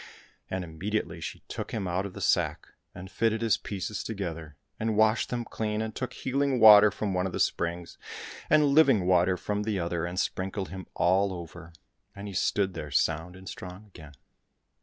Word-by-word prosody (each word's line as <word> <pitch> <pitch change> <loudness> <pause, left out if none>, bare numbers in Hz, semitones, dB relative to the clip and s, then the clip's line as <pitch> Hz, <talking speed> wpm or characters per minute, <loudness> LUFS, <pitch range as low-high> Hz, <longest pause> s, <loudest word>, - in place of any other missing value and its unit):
And 95 -1 -3
immediately 85 +1 -3
she - - -7
took - - -5
him 100 -4 -2
out 90 +3 -1
of 95 - -12
the - - -7
sack, - - +1 0.3
and 95 +2 -9
fitted 115 0 0
his 115 -3 +3
pieces 100 +1 -4
together, 85 -8 -5 0.2
and 110 -1 -1
washed 110 +1 +3
them 120 -1 -3
clean, 105 -1 -3
and 110 0 -3
took 130 - -4
healing 135 0 0
water 105 -1 +9
from 100 0 -3
one 90 +1 0
of 90 - -7
the - - -3
springs, 85 0 -2 0.5
and 150 0 +5
living 140 - +5
water 90 0 +3
from 105 +2 -2
the 105 -2 -1
other, 85 -1 -2
and 90 +1 -3
sprinkled 95 +1 -2
him 95 -1 -8
all 95 +3 +2
over, 85 -1 -9 0.4
and 100 +1 -7
he 100 - -7
stood 95 +1 +1
there 75 - -6
sound 80 +5 0
and 95 0 -13
strong 90 +4 -8
again. 80 -7 -14
95 Hz, 185 wpm, -28 LUFS, 90-110 Hz, 0.5 s, water